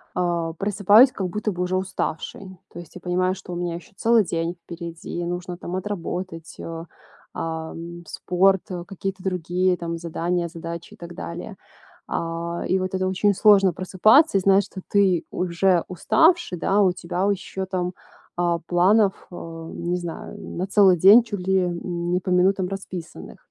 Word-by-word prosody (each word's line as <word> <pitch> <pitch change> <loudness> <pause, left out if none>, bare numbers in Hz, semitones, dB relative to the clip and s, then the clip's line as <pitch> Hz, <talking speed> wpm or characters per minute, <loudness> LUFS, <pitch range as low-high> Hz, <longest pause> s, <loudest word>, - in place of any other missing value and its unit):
а, 170 -2 -1
просыпаюсь 205 - +5
как 195 -6 -3
будто 210 +3 -2
бы 180 -2 -4
уже 180 +1 0
уставшей. 185 0 -4 0.2
То 175 - -8
есть, 170 -3 -12
я 180 - -9
понимаю, 185 +1 0
что 180 - -9
у - - -4
меня 175 -1 -3
ещё 175 +7 -11
целый 230 +2 +4
день 170 -1 -2
впереди, 170 0 -6
нужно 175 +1 -4
там 180 0 -6
отработать, 180 -3 -5
э, 165 0 -6 0.5
ам, 165 +1 -6
спорт, 190 0 +2 0.2
какие-то 195 -1 -5
другие 180 0 0
там 170 -1 -4
задания, 170 +1 -2
задачи 170 0 -8
и - - -30
так 170 0 -9
далее. 175 +4 -7 0.5
А. 170 +1 -3
И 190 - +2
вот 185 0 -3
это 185 0 0
очень 190 +1 +2
сложно 195 -3 +5
просыпаться 200 - +4
и - - -3
знать, 195 +1 +4
что 190 - -9
ты 195 -4 +2
уже 180 0 +1
уставший, 325 - +2
да, 195 +4 +2
у 190 -2 +4
тебя, 180 +2 -2
у - - +3
ещё 190 0 -4
там, 180 -1 -2 0.4
а, 175 -1 +1
планов, 195 +3 +3
э, - - -9 0.4
не 175 +1 -2
знаю, 175 -2 -7
на 180 - -4
целый 195 -2 +5
день, 200 +8 +8
чуть 215 -4 -5
ли, 190 -2 +2
не 175 0 -1
по 185 - -5
минутам 185 +1 +3
расписанных. 190 -4 -8
180 Hz, 165 wpm, -23 LUFS, 170-195 Hz, 0.5 s, день